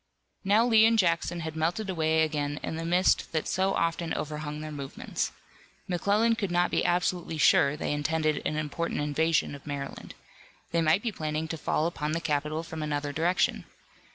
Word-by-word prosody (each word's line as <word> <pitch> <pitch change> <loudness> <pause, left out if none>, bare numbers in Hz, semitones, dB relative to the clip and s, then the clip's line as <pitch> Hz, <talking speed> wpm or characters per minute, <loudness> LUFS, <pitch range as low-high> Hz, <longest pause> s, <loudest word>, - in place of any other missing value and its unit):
Now 210 +4 +4
Lee 225 -2 +6
and 230 0 +3
Jackson 170 -2 +1
had 160 -1 -5
melted 170 +7 -1
away 160 -3 +2
again 145 -2 -2
in - - -3
the 165 +1 -4
mist 180 +2 +2
that 155 - -1
so 190 +1 +1
often 165 0 -1
overhung 150 0 -4
their 155 0 -6
movements. 140 -2 -4 0.6
McClellan 205 +6 +2
could 215 -4 -2
not 175 0 +1
be - - +1
absolutely 175 -2 0
sure 145 -1 +4
they - - -2
intended 155 0 0
an 150 - -1
important 155 +2 -2
invasion 150 0 +1
of 140 +1 -11
Maryland. 140 -1 -6 0.6
They 170 0 +2
might 160 +5 +3
be 235 - -1
planning 155 -3 -3
to 165 - -2
fall 155 0 0
upon 155 -3 -2
the 165 - 0
capital 155 0 -1
from 160 -1 -7
another 145 -1 -2
direction. 170 +5 +1
160 Hz, 180 wpm, -28 LUFS, 150-175 Hz, 0.6 s, Lee